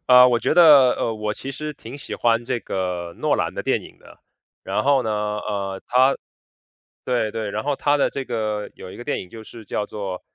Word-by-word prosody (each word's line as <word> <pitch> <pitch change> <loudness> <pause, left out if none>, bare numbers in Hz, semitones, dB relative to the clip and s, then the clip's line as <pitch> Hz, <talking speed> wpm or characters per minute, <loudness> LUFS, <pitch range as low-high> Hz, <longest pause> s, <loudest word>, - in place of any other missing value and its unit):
呃， 125 0 +8
我 120 -1 +2
觉 - - 0
得， 145 -7 +8
呃， 115 - -1
我 105 0 -2
其 135 - -7
实 150 +2 -5
挺 130 -1 -10
喜 140 - -6
欢 115 0 +1
这 120 -1 -2
个 90 -2 -3
诺 - - +1
兰 - - -2
的 - - -4
电 - - 0
影 - - -14
的。 - - -17 0.5
然 105 - -1
后 140 -2 +4
呢， 110 - -2
呃， 105 -2 -3
他 130 +2 +4 0.9
对 120 -4 0
对， 110 -2 -3
然 105 +1 -3
后 145 -1 0
他 145 +1 +2
的 140 - +2
这 135 -1 -4
个 110 -3 -3
有 - - -10
一 - - -10
个 120 - -9
电 - - -2
影 90 - -10
就 110 -1 -10
是 115 0 -12
叫 105 +1 -3
作 95 -3 -5
115 Hz, 240 characters per minute, -22 LUFS, 105-130 Hz, 0.9 s, 呃